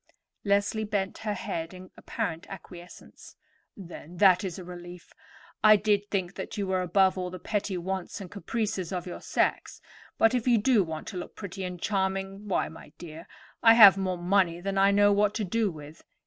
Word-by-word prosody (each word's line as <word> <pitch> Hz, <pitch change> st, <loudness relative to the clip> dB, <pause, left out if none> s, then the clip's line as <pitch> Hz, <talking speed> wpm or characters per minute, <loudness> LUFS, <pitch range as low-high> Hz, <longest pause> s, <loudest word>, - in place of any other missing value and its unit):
Leslie 205 Hz, +2 st, +1 dB
bent 200 Hz, -2 st, -3 dB
her 210 Hz, -2 st, -3 dB
head 165 Hz, -1 st, -5 dB
in 185 Hz, 0 st, -12 dB
apparent 165 Hz, 0 st, -4 dB
acquiescence. 175 Hz, -2 st, -12 dB, 0.4 s
"Then, 175 Hz, -2 st, -11 dB
that 185 Hz, -1 st, +5 dB
is 185 Hz, -3 st, -4 dB
a 185 Hz, -, -8 dB
relief. 175 Hz, 0 st, -11 dB, 0.5 s
I 215 Hz, 0 st, +8 dB
did 205 Hz, 0 st, 0 dB
think 190 Hz, -2 st, -2 dB
that -, -, -7 dB
you 200 Hz, -, -1 dB
were 190 Hz, -1 st, 0 dB
above 190 Hz, +1 st, +2 dB
all 180 Hz, -1 st, -3 dB
the 185 Hz, -, -8 dB
petty 195 Hz, +1 st, -3 dB
wants 190 Hz, +3 st, -4 dB
and 190 Hz, -3 st, -9 dB
caprices 205 Hz, -3 st, -3 dB
of 180 Hz, -2 st, -4 dB
your 180 Hz, -, -7 dB
sex; -, -, -1 dB, 0.4 s
but 225 Hz, -, +4 dB
if 250 Hz, -1 st, -1 dB
you 240 Hz, -2 st, +5 dB
do 225 Hz, -1 st, +3 dB
want 160 Hz, -2 st, -7 dB
to 185 Hz, -, -7 dB
look 175 Hz, -, -7 dB
pretty 195 Hz, -1 st, -7 dB
and 180 Hz, -1 st, -5 dB
charming, 195 Hz, +1 st, -2 dB
why, 195 Hz, -, 0 dB
my 160 Hz, -, -13 dB
dear, 165 Hz, 0 st, -10 dB, 0.3 s
I 225 Hz, -1 st, +7 dB
have 205 Hz, -5 st, +10 dB
more 190 Hz, -2 st, -2 dB
money 175 Hz, -1 st, +1 dB
than 195 Hz, +2 st, -3 dB
I 195 Hz, 0 st, +5 dB
know 205 Hz, 0 st, +4 dB
what 205 Hz, 0 st, +2 dB
to 220 Hz, -, -1 dB
do 215 Hz, +3 st, 0 dB
with. 150 Hz, -2 st, -11 dB
190 Hz, 190 wpm, -27 LUFS, 180-205 Hz, 0.5 s, have